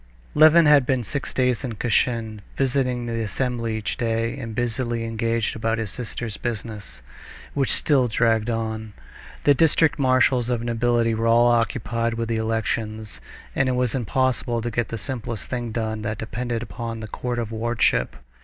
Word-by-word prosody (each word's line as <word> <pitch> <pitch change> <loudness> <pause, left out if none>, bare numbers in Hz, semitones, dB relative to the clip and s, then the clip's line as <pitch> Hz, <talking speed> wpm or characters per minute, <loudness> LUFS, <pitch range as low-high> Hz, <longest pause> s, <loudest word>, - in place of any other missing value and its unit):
Levin 155 +2 +7
had 150 -2 +6
been 125 -1 0
six 140 +6 -4
days 125 -1 +1
in 125 -4 -3
Kashin, 110 -1 0 0.2
visiting 125 -2 0
the 115 -1 -2
assembly 115 0 -2
each 110 - -3
day, 115 -1 -1
and 115 -4 -6
busily 120 0 -1
engaged 115 0 -1
about 115 0 0
his 110 -3 -3
sister's 115 -2 -5
business, 110 - -6 0.5
which 135 -2 +1
still 135 -5 +3
dragged 115 0 +2
on. 110 -2 -3 0.5
The 145 - +6
district 160 +2 +3
marshals 130 -2 +3
of 120 -2 -1
nobility 120 0 +1
were 115 +1 0
all 120 +1 +5
occupied 115 -1 0
with 115 0 -3
the 115 - 0
elections, 110 -1 -2 0.3
and 130 - +2
it - - +1
was 125 -2 0
impossible 130 -1 0
to 120 - -2
get 120 0 -1
the 115 - -5
simplest 115 -2 -5
thing 120 -2 -3
done 110 -1 -2
that 110 0 -3
depended 120 +1 -3
upon 115 -1 -5
the 110 - -6
court 120 +3 -4
of 115 -2 -3
wardship. 110 - +1
115 Hz, 165 wpm, -23 LUFS, 110-125 Hz, 0.5 s, Levin